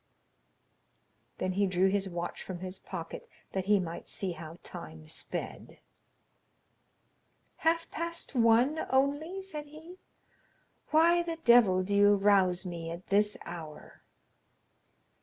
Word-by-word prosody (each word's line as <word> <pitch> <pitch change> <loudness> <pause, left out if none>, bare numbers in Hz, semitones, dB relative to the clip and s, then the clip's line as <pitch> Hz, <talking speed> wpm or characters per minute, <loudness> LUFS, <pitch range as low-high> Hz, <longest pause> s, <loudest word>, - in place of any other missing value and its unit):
Then 185 - -1
he 200 +2 +1
drew 185 +1 +2
his 195 0 0
watch 175 -1 -4
from 185 - -6
his 185 0 -6
pocket, 170 -4 -7 0.2
that 190 -1 -2
he 205 0 +4
might 170 -2 -5
see 190 -2 -4
how 165 0 -9
time 160 -3 -8
sped. 155 - -6 1.8
"Half 330 +1 0
past 335 -1 -3
one 240 +5 +4
only?" 290 +8 0
said 300 -6 -7
he. 320 +5 -13 0.9
"Why 335 +2 +5
the 335 -1 -4
devil 220 -7 +6
do 200 +2 -3
you 205 0 +6
rouse 195 -2 +3
me 170 -2 -5
at 170 +2 -8
this 205 +1 +3
hour?" 160 -3 -9
200 Hz, 120 wpm, -30 LUFS, 180-295 Hz, 1.8 s, devil